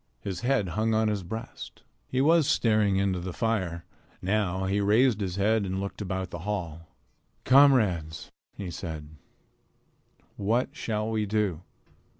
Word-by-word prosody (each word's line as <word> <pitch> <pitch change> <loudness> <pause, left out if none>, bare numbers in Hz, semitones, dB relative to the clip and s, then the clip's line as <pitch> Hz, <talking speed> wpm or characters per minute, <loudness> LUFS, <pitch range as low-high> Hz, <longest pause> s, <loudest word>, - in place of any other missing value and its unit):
His 95 0 -4
head 120 -4 +1
hung 110 +4 0
on 110 0 +2
his 105 -2 -1
breast. 110 +6 -8 0.2
He 130 - 0
was 160 0 +4
staring 105 -3 +2
into 95 -2 +1
the 90 +1 -5
fire. 95 -7 -1 0.3
Now 95 -1 0
he 100 +2 0
raised 110 +2 +3
his 90 -3 -2
head 105 +2 +2
and 95 0 -3
looked 100 +2 -5
about 95 -2 -3
the 85 - -6
hall. 85 -4 -4 0.6
"Comrades," 105 - +3 0.3
he 95 -3 -5
said, 80 -4 -6 1.3
"what 115 +6 +1
shall 110 -9 -2
we 110 -1 -1
do? 100 -6 0
100 Hz, 145 wpm, -27 LUFS, 90-110 Hz, 1.3 s, was